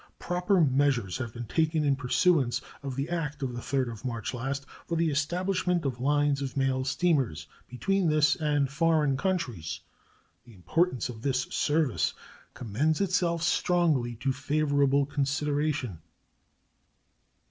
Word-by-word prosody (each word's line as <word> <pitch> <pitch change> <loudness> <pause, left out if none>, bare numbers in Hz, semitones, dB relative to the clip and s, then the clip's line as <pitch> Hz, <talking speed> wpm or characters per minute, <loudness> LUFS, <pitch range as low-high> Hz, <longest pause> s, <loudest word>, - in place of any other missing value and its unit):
Proper 180 +2 +1
measures 130 - +2
have 120 -3 -4
been 120 +1 -7
taken 160 +4 +1
in 140 -2 +3
pursuance 135 0 +2 0.2
of 135 -2 -5
the 135 +2 -2
act 150 -4 -3
of 125 -2 -2
the 120 - -5
3d 130 -2 -1
of 115 +1 -10
March 115 -3 -3
last 135 +3 -3 0.2
for 170 - -1
the 165 -1 +1
establishment 180 +3 0
of 125 -3 -2
lines 145 0 +2
of 135 0 -4
mail 135 -1 +1
steamers 130 - 0 0.2
between 190 +8 0
this 150 0 +4
and 145 -2 +1
foreign 150 -1 +2
countries. 130 - -2 0.6
The 120 -3 -16
importance 130 - 0
of 115 -3 -8
this 130 0 +1
service 140 - +1 0.4
commends 130 +8 0
itself 175 -3 +1
strongly 155 -8 +1
to 130 +4 -1
favorable 140 0 +2
consideration. 145 - -1
140 Hz, 135 wpm, -28 LUFS, 125-160 Hz, 0.6 s, this